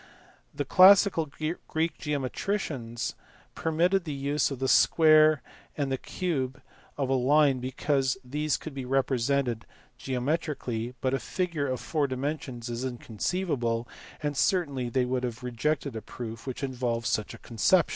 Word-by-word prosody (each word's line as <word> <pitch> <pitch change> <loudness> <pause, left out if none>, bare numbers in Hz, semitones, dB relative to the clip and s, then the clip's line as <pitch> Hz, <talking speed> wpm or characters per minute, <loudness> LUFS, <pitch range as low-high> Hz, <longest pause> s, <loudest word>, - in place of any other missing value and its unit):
The - - -3
classical 185 -3 +6
Greek 160 +2 -3
geometricians 140 - -2 0.4
permitted 175 +4 +1
the 150 -4 -4
use 140 +2 0
of 135 - -5
the 130 +1 -1
square 155 -2 +5 0.3
and 140 -2 -1
the 135 - +1
cube 140 -8 -2 0.4
of 140 -2 0
a - - +2
line 135 +1 +4
because 130 +1 0
these 150 +3 -1
could 155 - -8
be 135 -1 -5
represented 130 -2 0 0.3
geometrically, 125 -3 -2
but 130 0 0
a 135 - +1
figure 170 -5 -2
of 130 -1 -2
four 150 -3 0
dimensions 130 -2 -4
is 120 +1 -4
inconceivable, 120 - -2 0.4
and 145 -1 -1
certainly 140 -7 +1
they 125 +1 +1
would 125 0 -1
have 125 0 -4
rejected 125 +2 -1
a 110 - -4
proof 115 +1 -8
which 130 +2 -5
involved 120 -3 -2
such 105 -2 -1
a - - -11
conception. 150 - +2
135 Hz, 145 wpm, -28 LUFS, 125-155 Hz, 0.4 s, classical